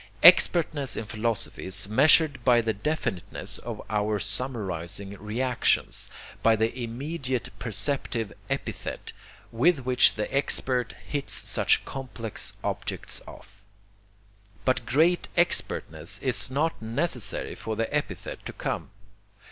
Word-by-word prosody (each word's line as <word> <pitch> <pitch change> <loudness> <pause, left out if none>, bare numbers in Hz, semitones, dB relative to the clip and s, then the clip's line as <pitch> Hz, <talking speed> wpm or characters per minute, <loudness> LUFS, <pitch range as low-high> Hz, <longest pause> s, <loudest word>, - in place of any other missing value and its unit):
Expertness 155 -5 +6
in - - -2
philosophy 110 0 -2
is 95 +1 +2
measured 140 +3 +4
by 120 -1 +5
the 115 -1 0
definiteness 115 - -3
of - - -6
our 105 0 0
summarizing 100 -6 -3
reactions, 120 +4 +1 0.3
by 115 0 +5
the 110 +2 0
immediate 130 +1 -3
perceptive 120 -2 0 0.2
epithet - - -4 0.4
with 135 +3 +2
which 125 -1 +5
the 105 - -2
expert 130 -3 +1
hits 145 -2 -1
such - - +3
complex 125 -5 -5
objects - - -3
off. 100 +1 -14 1.0
But 130 -3 +1
great 165 +6 +3
expertness 85 - 0
is 115 -7 +1
not 150 +3 0
necessary 120 0 -1
for 110 - -4
the 115 +1 0
epithet 150 - -3
to - - -6
come. - - -3
120 Hz, 115 wpm, -27 LUFS, 110-140 Hz, 1.0 s, Expertness